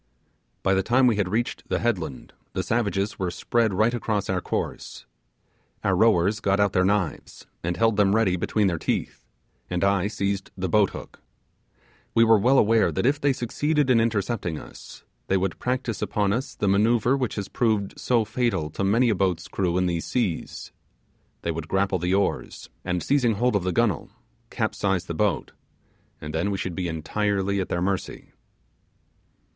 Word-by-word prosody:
By 95 - +3
the 95 - +3
time 125 +6 +3
we 120 -4 +3
had 100 -3 0
reached 115 +5 -2
the - - +1
headland, 95 - -3 0.2
the 95 - -1
savages 100 0 -1
were 90 -2 -1
spread 110 +5 0
right 110 +5 +2
across 110 -5 -1
our 95 -1 -1
course. - - -4 0.8
Our 95 - +2
rowers 105 0 +3
got 100 -1 +1
out 100 -1 +2
their 90 - +3
knives 100 -3 -1 0.2
and 85 +1 -2
held 115 -2 +2
them 100 -1 +4
ready 110 -5 +2
between 105 +4 0
their 85 -4 0
teeth, - - -3 0.4
and 90 0 -1
I 100 -1 +2
seized 100 -2 -2
the 95 0 -2
boat 100 +2 +3
hook. - - -10 0.9
We 115 - +6
were 110 -2 +5
all 130 +4 +4
aware 115 0 +4
that - - -1
if 145 +3 +2
they 140 - +3
succeeded 145 +3 0
in 120 - +5
intercepting 110 -6 -1
us - - -12 0.2
they 95 - +2
would 95 0 -2
practise 125 -3 -2
upon 100 -1 0
us 125 +4 -3
the 100 - -1
manoeuvre 115 +5 +3
which 125 -6 -2
has 100 -1 -4
proved 110 -4 -1
so 120 -3 +2
fatal 110 -9 -1
to 100 - -3
many 115 +5 +3
a - - +3
boat's 95 -3 -1
crew 90 -2 -1
in 90 - +2
these 85 -2 -1
seas. 110 -10 -2 0.7
They 85 - 0
would 80 -1 -5
grapple 95 0 +1
the 90 +3 +1
oars, 100 - -2
and 90 -2 -2
seizing 125 -6 +2
hold 120 +2 +1
of 100 - +1
the 90 - 0
gunwhale, 105 -4 0 0.4
capsize 95 -3 -1
the 85 - -4
boat, 100 +3 0 0.7
and 75 0 -7
then 85 +5 0
we 100 - -1
should 90 -1 -3
be 90 +1 -3
entirely 100 +4 -1
at 95 - -4
their 85 0 -1
mercy. 95 0 -3
100 Hz, 180 wpm, -25 LUFS, 90-115 Hz, 0.9 s, We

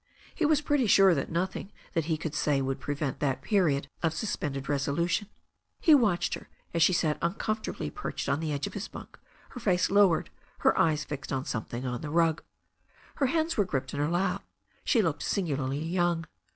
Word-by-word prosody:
He 320 - +1
was 300 -1 +3
pretty 290 -5 +2
sure 195 -2 +6
that 140 -4 -2
nothing 185 +3 -2 0.2
that 165 -2 0
he 160 -1 0
could 160 -1 -4
say 145 -2 +1
would 135 0 -2
prevent 145 -2 -3
that 135 -3 -1
period 155 -10 +2
of 160 -1 0
suspended 145 -8 -3
resolution. 150 +8 0 0.5
He 320 - +6
watched 215 -11 +3
her - - -7 0.2
as 170 - 0
she 165 - +6
sat 160 -4 +1
uncomfortably 195 - -2
perched - - -4
on 145 - +1
the 160 -1 -2
edge 140 -1 -1
of - - -6
his 205 0 -4
bunk, - - -11 0.3
her 245 - -8
face 185 -6 +2
lowered, 195 -4 +4 0.3
her - - +4
eyes 155 -2 +2
fixed 140 -2 -6
on 135 -1 -1
some 110 - -3
thing 120 +2 -5
on 125 -1 -3
the 150 - -5
rug. 165 0 +2 0.8
Her 275 - +2
hands 320 +4 0
were 205 - +3
gripped 135 -6 -3
in 145 - -3
her 145 +1 +1
lap. 180 +2 0 0.4
She - - +3
looked - - -1
singularly 145 -5 -1
young. 175 -1 +1
165 Hz, 195 wpm, -29 LUFS, 145-195 Hz, 0.8 s, sure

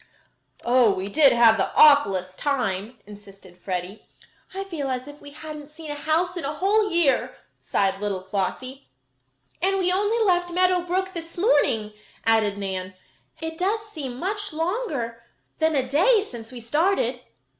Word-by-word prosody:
"Oh, 240 -2 +4
we 190 +1 -4
did 285 +4 +5
have 235 -2 +5
the - - 0
awfulest 195 -12 +5
time," 235 -5 -2
insisted 195 -3 -14
Freddie. 180 +2 -6 0.4
"I 390 +1 -4
feel 325 -8 -4
as 255 +1 -3
if 290 0 -12
we 290 - -10
hadn't 300 0 -9
seen 305 0 -9
a - - -2
house 320 +4 0
in 345 - -4
a 285 +2 -3
whole 410 +5 +2
year," 340 -7 +1 0.2
sighed 195 0 -1
little 195 -3 -2
Flossie. 215 +8 -4 0.7
"And 390 +2 +1
we 360 -1 +1
only 410 +4 +1
left 355 -2 +2
Meadow 365 +1 +2
Brook 375 +2 -2
this 335 -1 -8
morning," 260 - +2 0.3
added 220 -3 +2
Nan. 190 -1 -4 0.5
"It 320 0 -5
does 405 +4 0
seem 270 -9 -6
much 410 +6 -3
longer 310 - -3 0.4
than 315 -1 +2
a 260 -2 0
day 390 - +4
since 235 - -9
we 250 - -8
started." 260 - 0
285 Hz, 155 wpm, -24 LUFS, 220-355 Hz, 0.7 s, did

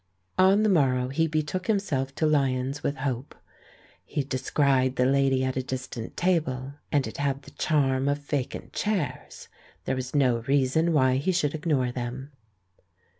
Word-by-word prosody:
On 195 +3 +5
the - - +3
morrow 130 -8 +2
he 160 +5 +1
betook 155 +4 -2
himself 140 -11 0
to 160 - 0
Lyons* 135 -2 +1
with 140 - -1
hope. 130 -1 -3 0.7
He 145 - -2
descried 130 0 +1
the 125 - +2
lady 135 -1 +3
at 130 0 -1
a 130 - 0
distant 130 -3 -6
table, 140 -7 0 0.2
and 140 -3 +2
it 110 - -7
had 140 -1 -1
the - - -13
charm 135 -3 +1
of 145 - +1
vacant 145 -2 -4
chairs. 185 -11 -3 0.4
There - - 0
was 130 +2 -5
no 125 -5 +3
reason 140 +4 +2
why 130 -4 +3
he 145 +8 0
should 150 -5 0
ignore 150 -6 0
them. 125 +3 -5
135 Hz, 160 wpm, -26 LUFS, 130-155 Hz, 0.7 s, On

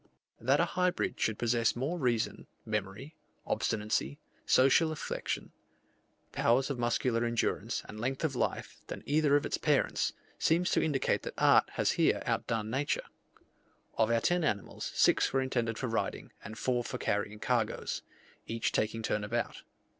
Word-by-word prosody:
That 130 +5 +3
a 170 - +4
hybrid 180 +1 0
should 110 -1 0
possess 115 -1 +1
more 145 +9 -2
reason, 120 -5 -1 0.2
memory, 105 +7 -4 0.3
obstinacy, 110 +6 -1 0.3
social 140 +5 +5
affection, 155 - -4 0.8
powers 130 +4 +2
of 130 - -4
muscular 120 0 +1
endurance, 120 -1 -1
and 105 - -9
length 130 +5 -2
of 150 -4 0
life, - - -2
than - - -7
either 145 0 +3
of 145 - +2
its - - -2
parents, - - +1 0.3
seems 170 +2 +2
to - - +3
indicate 145 -4 +1
that - - -7
art - - +5
has - - +1
here - - +2
outdone 110 -1 -1
nature. 140 +4 -1 0.9
Of 110 - +2
our 115 0 +2
ten 175 +5 +2
animals, 105 -9 -2
six - - +4
were 135 - +2
intended 115 -3 -1
for - - -3
riding, 115 -2 -2
and 110 +1 -8
four 120 0 0
for - - -4
carrying 105 +1 -1
cargoes, 115 -1 -1 0.5
each 115 0 -1
taking 110 +1 -1
turn 105 -1 0
about. 115 +3 -2
120 Hz, 155 wpm, -31 LUFS, 110-140 Hz, 0.9 s, social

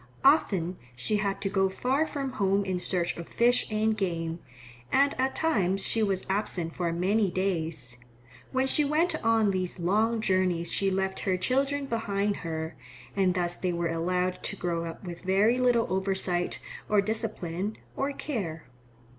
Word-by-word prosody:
Often 190 - +3 0.2
she 165 - 0
had 200 -1 -1
to 200 - 0
go 195 -1 +2
far 265 +10 0
from 275 -3 -3
home 200 -4 +1
in 185 -2 -1
search 175 -1 0
of 170 - -7
fish 245 +1 +3
and 215 0 +1
game, 170 -4 -2 0.5
and 280 +1 +4
at 265 +1 +1
times 195 - +1
she 225 - +1
was 195 -3 0
absent 190 -4 -1
for 175 -2 -1
many 195 +4 +2
days. 160 -9 -2 0.5
When 260 0 +2
she 295 +3 +3
went 310 +5 +2
on 225 -2 +3
these 185 -2 -2
long 215 +6 +2
journeys 185 -4 +1
she 195 - +1
left 190 0 -1
her 185 -2 0
children 275 +7 +1
behind 205 -4 -1
her, 160 -1 -4 0.4
and 190 -2 +2
thus 175 -1 0
they 180 -1 -1
were 170 -1 -1
allowed 180 +2 0
to - - -2
grow 170 -3 -2
up 165 +3 -7
with 175 -2 -7
very 205 +6 +3
little 245 -2 +3
oversight 190 -2 0 0.3
or 210 - +4
discipline 205 -2 -2 0.2
or 275 +1 -1
care. 195 - -4
195 Hz, 165 wpm, -28 LUFS, 175-225 Hz, 0.5 s, and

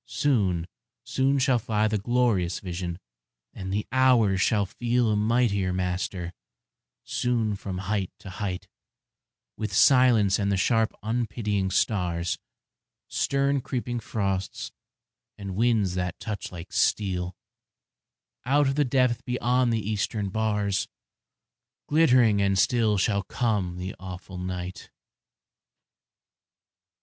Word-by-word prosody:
Soon, 100 - +1 0.4
soon 135 +1 +1
shall 130 -2 +3
fly 110 -1 0
The 105 -1 0
glorious 105 -6 +1
vision, 90 -2 -4 0.6
and 95 -1 -6
the 105 +2 -1
hours 120 -7 +4
shall 105 -1 +2
feel 120 +3 0
A - - +2
mightier 105 -3 +1
master; 90 -1 -2 0.7
soon 115 -4 0
from 95 -1 -5
height 95 0 -2
to 95 - -10
height, 95 -1 -4 0.9
With 110 - -3
silence 120 -7 +5
and 100 0 0
the 100 - +1
sharp 115 +3 +2
unpitying 105 -3 -1
stars, 90 -4 0 0.7
Stern 140 0 +1
creeping 120 -1 -3
frosts, 100 -4 -3 0.7
and 100 -2 -6
winds 110 -4 +2
that 90 -1 -3
touch 105 -3 -5
like 85 -1 -9
steel, 90 -3 0 1.1
Out 145 +2 +3
of 135 - +1
the 145 +1 +2
depth 125 -2 +1
beyond 125 0 +1
the 110 -3 -1
eastern 105 -1 -1
bars, 105 -2 0 1.0
Glittering 125 -9 +4
and 100 -1 +2
still 110 +1 +3
shall 100 +1 +1
come 100 -4 -1
the 90 +1 -5
awful 90 0 -8
night. 90 0 -5
105 Hz, 115 wpm, -26 LUFS, 95-120 Hz, 1.1 s, silence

